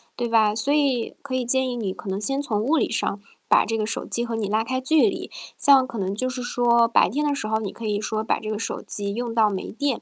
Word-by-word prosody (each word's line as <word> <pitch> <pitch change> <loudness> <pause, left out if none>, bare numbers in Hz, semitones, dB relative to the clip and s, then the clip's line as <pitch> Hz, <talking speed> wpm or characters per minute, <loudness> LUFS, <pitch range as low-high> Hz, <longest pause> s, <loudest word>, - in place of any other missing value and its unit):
对 240 -1 -2
吧？ 215 -2 +3
所 255 +6 0
以 275 -6 +1
可 270 -2 -4
以 255 - 0
建 260 +2 +1
议 245 - -3
你 215 -5 -2
可 200 - -10
能 190 +1 -2
先 270 +6 -1
从 215 -7 -1
物 300 +7 +2
理 260 - +1
上， 220 -3 -1 0.3
把 - - +5
这 225 +1 -1
个 215 - -1
手 225 - -3
机 235 - -2
和 230 -1 -3
你 220 -2 -2
拉 215 +2 +1
开 260 +3 -2
距 305 +8 +3
离， - - -6 0.3
像 275 -3 +5
可 235 - -7
能 195 -1 -2
就 255 +4 -1
是 255 0 -5
说， 240 -1 +3
白 230 - +4
天 295 +8 -1
的 290 - +1
时 225 - -4
候 220 0 +1
你 215 -3 -4
可 230 - -8
以 210 -1 0
说 215 0 -2
把 220 - 0
这 215 - -6
个 215 - -2
手 - - -4
机 200 -1 -4
用 240 0 -3
到 220 -2 +4
没 190 -2 -4
电， 275 +1 -1
230 Hz, 305 characters per minute, -24 LUFS, 215-260 Hz, 0.3 s, 把